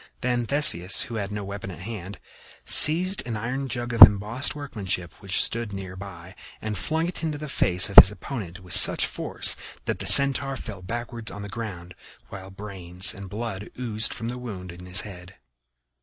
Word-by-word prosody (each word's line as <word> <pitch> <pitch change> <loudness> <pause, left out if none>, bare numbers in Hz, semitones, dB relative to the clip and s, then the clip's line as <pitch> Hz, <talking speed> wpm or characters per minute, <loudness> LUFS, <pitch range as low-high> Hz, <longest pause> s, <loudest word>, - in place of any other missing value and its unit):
Then 125 -2 -2
Theseus, 100 - +4
who 115 - -9
had 100 0 -7
no 105 0 -6
weapon 100 -1 -8
at 90 - -11
hand, 100 -2 -9 0.5
seized 180 +5 +5
an 115 -3 -5
iron 125 +5 -5
jug 120 -1 -5
of 115 - -5
embossed 105 +7 +5
workmanship 100 - -6
which 95 -2 -1
stood 115 -3 -4
near 95 -2 -8
by 95 -2 -12 0.3
and 110 -1 -6
flung 160 - -3
it 180 - -6
into 155 -3 -4
the 150 +1 -8
face 90 -9 +1
of 100 - -10
his - - +11
opponent 95 -3 -9
with 90 -2 -6
such - - +6
force - - -3 0.3
that - - -4
the - - -5
Centaur 140 0 +5
fell 105 -7 -10
backward 115 +3 -7
on 100 - -9
the 100 - -9
ground, 95 -6 -8 0.4
while 95 0 -11
brains 95 -2 -1
and 100 -3 -11
blood 105 -1 -7
oozed 110 -3 -1
from 115 - -5
the 125 +1 -7
wound 95 -7 -9
in 90 +1 -13
his 90 0 +3
head. 95 -2 -13
105 Hz, 185 wpm, -23 LUFS, 95-120 Hz, 0.5 s, his